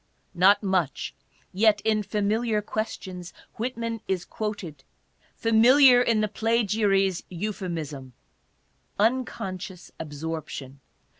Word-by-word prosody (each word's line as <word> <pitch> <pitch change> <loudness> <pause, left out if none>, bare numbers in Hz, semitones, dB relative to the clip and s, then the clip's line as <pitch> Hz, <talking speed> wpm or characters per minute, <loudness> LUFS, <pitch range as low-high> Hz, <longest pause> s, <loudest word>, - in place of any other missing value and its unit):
Not 190 +4 +5
much 185 -8 -1 0.4
yet 210 +2 +4
in 215 -1 +1
"Familiar 210 +2 0
Quotations," 190 -5 -5 0.2
Whitman 230 -1 -3
is 185 -2 -1
quoted, 190 -10 -5 0.5
familiar 245 +3 +6
in 230 -3 +2
the 215 - +1
plagiary's 205 -4 +1
euphemism 170 -8 -5 0.3
— - - -43
" - - -41
unconscious 190 -7 -6
absorption." 150 -3 -6
205 Hz, 95 wpm, -26 LUFS, 175-220 Hz, 0.5 s, familiar